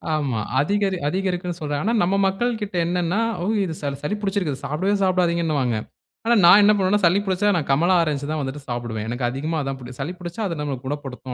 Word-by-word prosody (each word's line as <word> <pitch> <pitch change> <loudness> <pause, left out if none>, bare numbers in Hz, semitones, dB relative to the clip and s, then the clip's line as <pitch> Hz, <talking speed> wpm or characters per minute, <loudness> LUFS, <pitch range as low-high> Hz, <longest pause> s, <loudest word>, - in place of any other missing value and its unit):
ஆமா. 135 -7 -1 0.2
அதிகரி 195 +5 +1
அதிகரிக்குன்னு 180 0 -2
சொல்றாங்க. 145 -1 -2
ஆனா 230 - +1
நம்ம 185 +3 +1
மக்கள்கிட்ட 210 0 -2
என்னன்னா, 175 +3 0 0.2
ஓ! - - -2 0.2
இது 175 -4 -3
ச - - -5 0.2
சளி 175 +8 -1
புடிச்சிருக்கு, 195 -9 -1
சாப்பிடவே 185 +8 0
சாப்பிடாதீங்கன்னுவாங்க. 170 -9 +1 0.5
ஆனா 235 +1 +4
நான் 190 +4 +9
என்ன 205 - +6
பண்ணுவேன்னா 200 +1 +2
சளி 180 +4 +4
புடிச்சா 195 +2 +2
நான் 155 - -2
கமலா 170 +7 +3
ஆரஞ்ச் 150 -3 -1
தான் 155 - -1
வந்துட்டு 135 +1 -5
சாப்பிடுவேன். 120 -3 -3
எனக்கு 120 +1 -1
அதிகமா 155 +6 -2
அதுதான் 135 -1 -3
புடிக்கும். 125 +1 -10
சளி 155 +6 -3
புடிச்சா 175 +4 -6
அது 165 -4 -4
நம்மள 145 -3 -2
குணப்படுத்தும் 135 -2 -5
170 Hz, 190 wpm, -22 LUFS, 140-190 Hz, 0.5 s, நான்